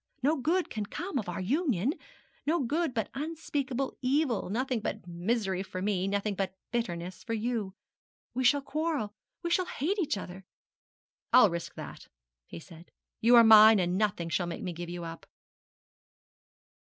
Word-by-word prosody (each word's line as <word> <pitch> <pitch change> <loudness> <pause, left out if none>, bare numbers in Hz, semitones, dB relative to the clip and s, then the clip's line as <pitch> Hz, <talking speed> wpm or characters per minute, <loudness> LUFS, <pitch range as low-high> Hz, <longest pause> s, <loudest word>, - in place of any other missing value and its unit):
No 300 +4 +3
good 330 +6 0
can 215 -2 -3
ever - - -19
come 340 -4 -3
of 200 - -5
our 175 - -4
union 255 - +1 0.5
no 335 +3 +2
good, 300 +5 0
but 225 -4 -2
unspeakable 280 -3 -3
evil; 260 - +1
nothing 250 +3 -1
but 205 - -4
misery 190 +2 -1
for 185 -1 -6
me 190 -1 0
nothing 200 +1 -1
but 190 -1 -3 0.2
bitterness 180 -7 -3
for 230 - -2
you. 220 -4 -2 0.6
We 260 - -1
shall 280 +3 +4
quarrel 300 -8 -2 0.3
we 340 - -2
shall 360 +1 +2
hate 380 +9 -1
each 305 - 0
other.' 190 0 -8 0.9
'I'll 215 -7 +7
risk 170 0 -5
that,' - - -9 0.4
he 85 - -8
said; 165 - -14 0.3
'you 235 +2 +6
are 235 - +9
mine, 220 0 +9
and 180 -1 +1
nothing 200 -4 0
shall 175 +1 0
make 170 - -5
me 180 - -3
give 170 +1 -6
you 175 0 -5
up.' 165 0 -8
220 Hz, 165 wpm, -30 LUFS, 185-275 Hz, 0.9 s, are